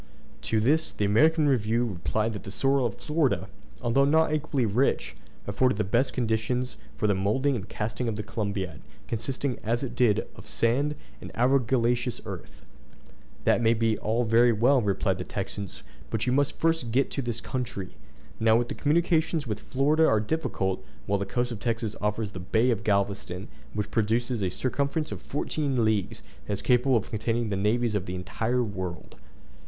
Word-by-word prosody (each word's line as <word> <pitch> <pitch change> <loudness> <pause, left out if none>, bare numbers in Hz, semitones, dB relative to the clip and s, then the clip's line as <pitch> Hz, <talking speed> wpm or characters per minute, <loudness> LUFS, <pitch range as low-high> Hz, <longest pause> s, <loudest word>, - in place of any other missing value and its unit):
To 110 - +3
this 155 +8 +2
the 105 - 0
American 155 +9 +4
Review 120 -2 +2
replied 110 +2 -1
that 105 - -6
the - - -9
soil 135 +4 +2
of 105 - -7
Florida, 150 -3 0 0.4
although 120 +3 +3
not 155 +2 +3
equally 145 -4 0
rich, 115 +6 +1 0.3
afforded 125 -5 +1
the 105 - +1
best 120 +7 +1
conditions 120 - -1 0.2
for 70 - -1
the 105 - +4
moulding 110 +9 +1
and 100 -5 -5
casting 110 +3 -3
of 115 - -1
the 105 - -4
Columbiad, 100 -9 -3 0.3
consisting 125 +3 -2
as 120 +4 0
it 125 -2 -4
did 120 -5 +3
of - - -12
sand 140 +6 +1 0.3
and - - -8
argillaceous 125 -1 +2
earth. - - -8 0.8
"That - - +3
may 115 0 +4
be 115 -1 +2
all 115 +3 0
very 120 +1 +5
well," 125 +5 +4
replied 95 -2 0
the - - -2
Texans; 100 -1 -5 0.3
"but 110 0 -1
you 125 - +1
must 140 +1 +1
first 165 -7 +1
get 130 +3 +2
to 140 - -1
this 120 -2 -3
country. 120 -9 -4 0.5
Now 110 +1 +4
the 120 - -6
communications 160 0 +1
with 105 -3 -3
Florida 150 +7 +2
are 110 - +4
difficult, 105 -7 -1 0.2
while 100 0 +1
the 100 - -3
coast 120 +4 -1
of 115 - -5
Texas 115 -2 -2
offers 105 0 -1
the 95 - -7
bay 110 +7 +2
of 110 -3 -1
Galveston, 100 -2 -1 0.3
which 105 -1 -2
possesses 115 +2 0
a 95 - +1
circumference 140 - -1
of - - -5
fourteen 140 -4 -1
leagues, 105 -4 0 0.2
and - - -1
is 100 - -4
capable 125 0 +4
of 105 - -4
containing 115 +1 -1
the 100 - -1
navies 110 +4 +1
of 100 -2 -1
the 90 - -3
entire 110 +7 -1
world!" 95 -6 -5
115 Hz, 180 wpm, -27 LUFS, 105-130 Hz, 0.8 s, very